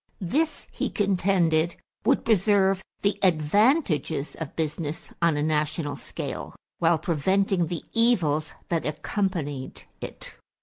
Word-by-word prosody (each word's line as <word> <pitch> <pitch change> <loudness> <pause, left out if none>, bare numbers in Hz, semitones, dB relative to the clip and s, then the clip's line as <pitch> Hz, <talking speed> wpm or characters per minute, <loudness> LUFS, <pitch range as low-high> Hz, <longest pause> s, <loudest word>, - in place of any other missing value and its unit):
This, 300 - 0
he - - -2
contended, 180 -5 +2 0.3
would - - +3
preserve 195 -2 +3 0.2
the 200 0 +1
advantages 180 - +2
of 160 -4 -7
business 160 0 -3
on 170 -3 +3
a 145 - 0
national 150 0 0
scale - - -6 0.2
while 165 0 +4
preventing 175 +3 +1
the 170 0 -4
evils 170 -11 +2 0.2
that 165 -2 0
accompanied 150 -4 -2 0.2
it. - - -6
170 Hz, 115 wpm, -26 LUFS, 155-195 Hz, 0.3 s, while